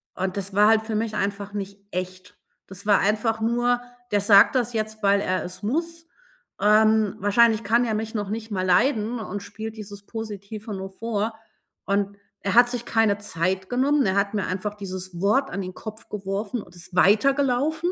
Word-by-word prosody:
Und 185 Hz, +1 st, -3 dB
das 200 Hz, 0 st, -3 dB
war 205 Hz, +2 st, +5 dB
halt 220 Hz, 0 st, +5 dB
für 220 Hz, 0 st, -4 dB
mich 220 Hz, 0 st, -1 dB
einfach 200 Hz, 0 st, -3 dB
nicht 200 Hz, -1 st, -5 dB
echt. 185 Hz, +2 st, -6 dB, 0.3 s
Das 195 Hz, +1 st, -10 dB
war 205 Hz, -1 st, +5 dB
einfach 220 Hz, +2 st, +1 dB
nur: 240 Hz, +2 st, +1 dB, 0.3 s
„Der 205 Hz, -1 st, +2 dB
sagt 200 Hz, +4 st, +6 dB
das 245 Hz, -1 st, 0 dB
jetzt, 215 Hz, -1 st, -3 dB
weil 200 Hz, 0 st, +4 dB
er 185 Hz, -2 st, -1 dB
es 180 Hz, +2 st, -9 dB
muss, 330 Hz, +8 st, -3 dB, 0.5 s
ähm, 215 Hz, 0 st, +4 dB
wahrscheinlich 220 Hz, +2 st, +3 dB
kann 235 Hz, +4 st, +3 dB
er 225 Hz, -, -1 dB
mich 220 Hz, +1 st, -3 dB
noch 205 Hz, -2 st, -2 dB
nicht 220 Hz, +1 st, -5 dB
mal 185 Hz, -2 st, -1 dB
leiden 225 Hz, +4 st, +2 dB
und 205 Hz, -2 st, -5 dB
spielt 220 Hz, +2 st, -7 dB
dieses 205 Hz, -1 st, -9 dB
Positive 215 Hz, 0 st, -7 dB
nur 190 Hz, 0 st, -5 dB
vor.“ 220 Hz, +2 st, -3 dB, 0.5 s
Und 200 Hz, 0 st, -1 dB, 0.2 s
er 195 Hz, -, -1 dB
hat 240 Hz, +2 st, +6 dB
sich 245 Hz, -1 st, -4 dB
keine 220 Hz, -3 st, +2 dB
Zeit 190 Hz, -1 st, -2 dB
genommen, 275 Hz, +2 st, +2 dB
er 190 Hz, -1 st, +1 dB
hat 200 Hz, +1 st, +1 dB
mir 205 Hz, -2 st, -1 dB
einfach 195 Hz, +3 st, -3 dB
dieses 185 Hz, -3 st, -7 dB
Wort 215 Hz, +8 st, +2 dB
an 195 Hz, -, -3 dB
den 185 Hz, -1 st, -6 dB
Kopf 215 Hz, +2 st, -9 dB
geworfen 205 Hz, +3 st, -3 dB
und 175 Hz, -, -16 dB
ist 175 Hz, +1 st, -10 dB
weitergelaufen. 275 Hz, -, +3 dB
210 Hz, 190 wpm, -24 LUFS, 195-225 Hz, 0.5 s, sagt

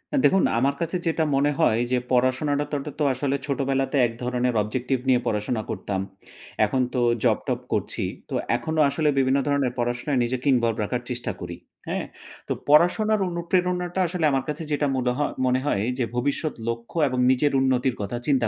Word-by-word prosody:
আ -, -, +3 dB
দেখুন 190 Hz, 0 st, +4 dB, 0.2 s
আমার 140 Hz, +2 st, +1 dB
কাছে 170 Hz, +2 st, -2 dB
যেটা 160 Hz, 0 st, +1 dB
মনে 145 Hz, +2 st, +3 dB
হয় 115 Hz, -8 st, +3 dB
যে 125 Hz, -, +3 dB
পড়াশোনাটা 130 Hz, +4 st, +2 dB
তো -, -, -1 dB, 0.2 s
তো -, -, +2 dB
আসলে 135 Hz, +2 st, -1 dB
ছোটবেলাতে 135 Hz, 0 st, 0 dB
এক -, -, -7 dB
ধরনের 125 Hz, 0 st, 0 dB
অবজেক্টিভ 125 Hz, +5 st, -1 dB
নিয়ে 125 Hz, -1 st, +5 dB
পড়াশোনা 110 Hz, +2 st, -1 dB
করতাম। 95 Hz, -2 st, -3 dB, 0.6 s
এখন 130 Hz, +5 st, 0 dB
তো 125 Hz, -, 0 dB, 0.2 s
জব-টব -, -, +1 dB
করছি। -, -, -2 dB, 0.3 s
তো -, -, -6 dB, 0.2 s
এখনো 155 Hz, +7 st, -2 dB
আসলে 150 Hz, +2 st, +1 dB
বিভিন্ন 135 Hz, +1 st, +3 dB
ধরনের 140 Hz, -3 st, +1 dB
পড়াশোনায় 120 Hz, +3 st, 0 dB
নিজেকে 125 Hz, +2 st, -3 dB
ইনভলভ 115 Hz, -2 st, +2 dB
রাখার 120 Hz, +4 st, -2 dB
চেষ্টা 125 Hz, -1 st, -3 dB
করি। 85 Hz, -1 st, -6 dB, 0.3 s
হ্যাঁ? -, -, -2 dB, 0.4 s
তো -, -, 0 dB
পড়াশোনার 190 Hz, +8 st, +4 dB
অনুপ্রেরণাটা 180 Hz, +1 st, -1 dB
আসলে 170 Hz, -1 st, -1 dB
আমার 135 Hz, -1 st, +1 dB
কাছে 150 Hz, +2 st, -3 dB
যেটা 145 Hz, 0 st, +1 dB
মুলহ 125 Hz, -1 st, 0 dB, 0.3 s
মনে 130 Hz, 0 st, +2 dB
হয় 100 Hz, -8 st, +1 dB, 0.2 s
যে 120 Hz, -, +2 dB
ভবিষ্যৎ 145 Hz, +5 st, -1 dB
লক্ষ্য 115 Hz, +6 st, -4 dB
এবং 130 Hz, -1 st, -2 dB
নিজের 140 Hz, +3 st, +2 dB
উন্নতির 130 Hz, -1 st, +1 dB
কথা 100 Hz, +4 st, -3 dB
চিন্তা 135 Hz, -5 st, +3 dB
130 Hz, 170 wpm, -24 LUFS, 125-150 Hz, 0.6 s, নিয়ে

